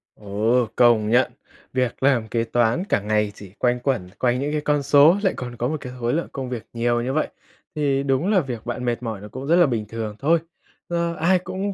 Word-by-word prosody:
Ồ, 110 +4 0
công 115 -3 +4
nhận, 125 +3 +3 0.4
việc 130 0 -1
làm 130 -5 +3
kế 115 0 0
toán 120 +7 +1
cả 200 - +1
ngày 105 0 0
chỉ 100 -3 -12
quanh 125 0 +1
quẩn 120 -8 -1
quanh 125 0 +1
những 145 +2 -2
cái 150 - -1
con 145 -1 +1
số 145 +6 +6
lại 190 - +2
còn 125 -1 -6
có 120 - -1
một 155 - -2
cái 125 -2 -7
khối 120 0 0
lượng 165 +3 -1
công 135 -2 -5
việc 120 -3 -5
nhiều 120 0 +1
như 130 +2 -2
vậy, 155 - +1 0.5
thì 140 -2 +1
đúng 135 +5 +1
là 195 - +5
việc 125 -8 -5
bạn 120 +1 -4
mệt 120 0 -1
mỏi 110 -4 -4
nó 105 - -8
cũng 130 +6 -7
rất 165 - +4
là 175 -1 +6
bình 115 -5 -1
thường 110 -2 -5
thôi. 165 +4 +3 0.5
Ờ, 170 -1 -1
ai 180 +3 +3
cũng 195 +2 -4
125 Hz, 235 wpm, -23 LUFS, 115-145 Hz, 0.5 s, số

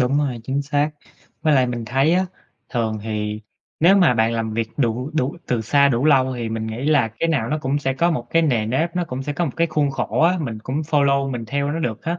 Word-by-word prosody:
đúng 130 +3 +2
rồi, 135 -5 -1
chính 135 +3 -1
xác! 145 +1 0 0.5
Với 155 -1 +3
lại 130 -2 +4
mình 120 -2 -4
thấy 135 +8 +2
á, 185 +1 +2 0.4
thường 110 -4 -1
thì 105 -1 -3 0.4
nếu 180 +5 +6
mà 180 -10 +5
bạn 115 0 +2
làm 115 -1 -2
việc 115 0 -1
đủ 125 +1 -1
đủ 140 0 0
từ 120 -2 0
xa 140 +6 +3
đủ 125 0 0
lâu 130 -4 +4
thì 120 -2 -3
mình 110 0 -3
nghĩ 110 +4 -5
là 145 -6 +3
cái 165 - +1
nào 140 -9 0
nó 155 +4 -1
cũng 140 +1 0
sẽ 135 -2 -1
có 170 +6 +2
một 125 -8 -2
cái 165 - +3
nề 120 -9 +1
nếp, 160 +9 -1
nó 180 - +1
cũng 130 -4 -5
sẽ 145 - -3
có 175 +5 -1
một 145 - -3
cái 170 - +2
khuôn 150 -3 0
khổ 135 -2 -2
á, 175 +3 +4
mình 120 -9 -4
cũng 130 +4 -4
follow 140 -3 +1
mình 120 -3 -4
theo 140 +4 -1
nó 165 - -2
được 120 -9 -3
á, 170 +2 -2
135 Hz, 260 wpm, -21 LUFS, 115-155 Hz, 0.5 s, nếu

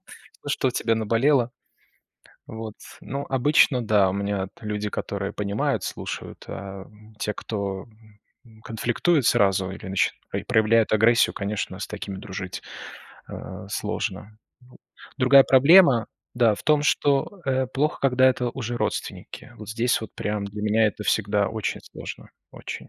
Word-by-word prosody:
всё, - - -15
что 130 - +1
у - - 0
тебя 115 -1 0
наболело. 115 +4 +2 1.0
Вот, 110 -1 -7 0.3
ну, 140 +2 -5
обычно, 135 -1 +3
да, 105 -3 +3
у - - -3
меня 100 -1 -2
люди, 105 -1 -3
которые 100 -1 -4
понимают, 100 -1 -1
слушают, - - -6
а 95 -1 -7 0.3
те, 105 - -2
кто 100 -2 -4 0.8
конфликтует 120 +6 0
сразу 95 -2 +3
или 95 - -8
нач 95 0 +2 0.4
проявляют 110 -1 +3
агрессию, 115 +2 +4
конечно, 100 -2 -3
с - - -4
такими 100 -2 -6
дружить, 95 -1 -6 0.7
а, 95 - -8
сложно. 105 0 -4 0.8
Другая 135 +1 +7
проблема, 135 -2 +6 0.3
да, 115 -3 +4
в - - -10
том, 150 -1 +3
что, 145 +6 +1
э, 130 -1 +1
плохо, 145 +4 -1
когда 130 -1 +4
это 125 -1 +1
уже 120 -1 -4
родственники. - - -4
Вот 110 - -10
здесь 120 +3 +1
вот 110 - -7
прям 105 -1 -2
для 105 +1 -7
меня 110 +1 +3
это 105 0 -4
всегда 100 -2 +1
очень 110 -1 -3
сложно, - - -9 0.2
очень. - - -8
110 Hz, 140 wpm, -24 LUFS, 100-125 Hz, 1.0 s, Другая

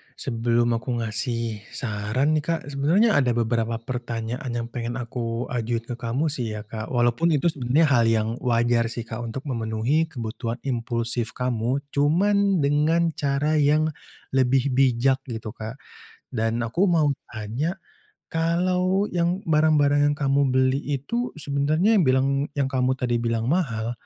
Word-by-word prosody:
sebelum 120 -1 0
aku 120 +2 -3
ngasih 110 0 -2 0.2
saran 115 +5 -1
nih 150 - -2
Kak, 165 -3 -2
sebenarnya 165 +12 +3
ada 125 -4 +1
beberapa 115 0 0
pertanyaan 120 +1 -4
yang 115 0 -2
pengen 120 -1 -4
aku 120 -1 -3
ajuin 115 -1 -1
ke 120 0 -7
kamu 135 +6 -1
sih 115 -6 -3
ya 105 - -6
Kak 110 0 -6
walaupun 120 +7 +2
itu 165 +4 +2
sebenarnya 140 +4 +2
hal 120 -3 +4
yang 110 -1 +2
wajar 120 -1 +2
sih 115 0 -5
Kak 115 -1 -7
untuk 120 +3 -5
memenuhi 120 +4 0
kebutuhan 115 -4 -4
impulsif 115 -2 -1
kamu, 125 +2 -1
cuman 190 +4 +2
dengan 155 +4 +2
cara 145 +1 0
yang 150 +2 +3 0.4
lebih 130 +1 +2
bijak 130 0 +3
gitu 110 -3 -5
Kak 110 +2 -7 0.5
dan 115 -1 -1
aku 120 +11 0
mau 170 -6 +3 0.2
tanya, 120 - -3 0.5
kalau 180 +3 +1
yang 175 +2 0
barang-barang 150 -2 +3
yang 145 - +1
kamu 140 -1 +2
beli 130 +1 +2 0.2
itu 235 - -3
sebenarnya 155 +9 +2
yang - - +4
bilang 130 +1 +3 0.3
yang 140 -1 0
kamu 130 0 +1
tadi 120 -2 -1
bilang 115 +2 -1
mahal, 120 -10 0
130 Hz, 145 wpm, -24 LUFS, 115-150 Hz, 0.5 s, hal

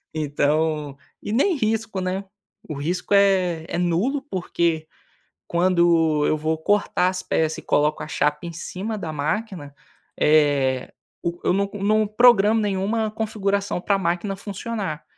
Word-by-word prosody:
Então 150 0 0 0.3
e 205 - -3
nem 330 - +3
risco, 225 -4 -1
né, 185 +1 -2 0.5
o 155 - -4
risco 175 +7 -1
é 185 -5 +3
é 170 - -3
nulo, 180 +12 0
porque 170 -4 -1 0.6
quando 170 -4 +3
eu 155 - +2
vou 155 +1 -1
cortar 190 +1 +1
as 185 0 -3
peças 160 0 0
e - - -7
coloco 150 +1 +1
a - - -7
chapa 150 -1 0
em 170 - -5
cima 190 +6 -5
da 165 -5 -5
máquina, 155 +1 -3 0.5
eh, 145 -4 +2 0.3
o 170 0 -3
eu - - +3
não 200 +1 0
não 210 +2 +2
programo 220 -1 +5
nenhuma 210 +2 -1
configuração 200 -3 -1
pra 200 +2 +1
máquina 185 +2 -1
funcionar. 195 -4 -5
180 Hz, 140 wpm, -23 LUFS, 155-205 Hz, 0.6 s, programo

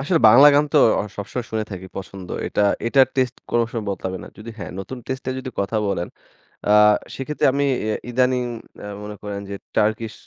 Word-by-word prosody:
আসলে 160 +5 +2
বাংলা 120 +7 +9
গান 145 +1 +5
তো - - +5 0.2
অ - - -1
সবসময় 115 +4 -4
শুনে 110 -1 -1
থাকি, 95 0 -7
পছন্দ। 95 -1 -8 0.2
এটা 105 - 0 0.2
এটার 135 +1 +5
টেস্টে 130 -1 0
কোনো 120 -1 +3
সময় 115 -3 -3
বদলাবে 95 -1 -4
না। - - -10
যদি 115 +2 -8
হ্যাঁ, - - -6
নতুন 110 +7 -6
টেস্টে 130 0 -4
এ - - -6
যদি 130 - -6
কথা 100 +3 -1
বলেন, 90 -3 -2 0.6
আ 105 - +3 0.4
সেক্ষেত্রে 145 +3 -2
আমি 140 - +1 0.2
এ - - 0 0.2
ইদানিং 125 +1 +2 0.4
অ্যা - - -8 0.2
মনে 105 0 -7
করেন 100 -1 -4
যে, 100 - -4 0.2
টার্কিশ 110 +1 +1
115 Hz, 200 wpm, -22 LUFS, 100-130 Hz, 0.6 s, বাংলা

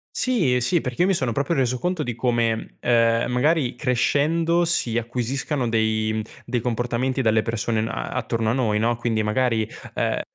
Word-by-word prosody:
Sì, 210 - +1
ehm, 125 - +2
sì, 165 +7 +1
perché 125 +3 -3
io 180 - +4
mi 195 - +3
sono 130 -8 0
proprio 140 +7 -1
reso 130 -2 +1
conto 180 +4 -2
di 120 -5 -3
come, 115 -2 -1
ehm, 115 0 +2
magari 135 +1 +1
crescendo 160 +6 +1
si 125 -9 0
acquisiscano 125 +3 -2
dei 110 -1 +1
mhmm, 110 - -1 0.2
dei 120 0 -1
comportamenti 120 +3 -1
dalle 110 -2 +3
persone 115 -1 -1
n 110 - -2
a - - -4
attorno 115 -1 -1
a - - +2
noi, 110 -5 +1
no. 115 +2 +1
Quindi 115 -2 -1
magari, 110 0 +1 0.3
ehm, - - 0
120 Hz, 185 wpm, -23 LUFS, 115-135 Hz, 0.3 s, io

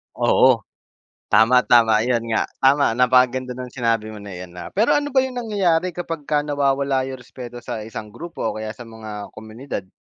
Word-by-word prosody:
Oo. - - +4 0.6
Tama, 110 +4 +5
tama, 115 -3 +5
ayan 120 +1 +1
nga, 110 - +1 0.2
tama. 135 -3 +4
Napakaganda 125 +1 +3
ng 125 0 -6
sinabi 115 -3 -1
mo 105 - -10
na 100 - -9
iyan, 90 -1 -9
ah. 90 -1 -8
Pero, 215 +4 +2
ano 290 0 0
ba 265 - +2
'yong 260 -1 +1
nangyayari 190 -7 +1
kapagka 165 -4 -3
nawawala 140 -2 +1
'yong 130 0 -6
respeto 125 0 -10
sa 110 -2 -6
isang 105 -1 -8
grupo 165 0 -6
o - - -1
kaya 110 0 -5
sa 115 +2 -10
mga 110 -2 -8
komunidad? 110 +1 -7
125 Hz, 180 wpm, -21 LUFS, 110-145 Hz, 0.6 s, Tama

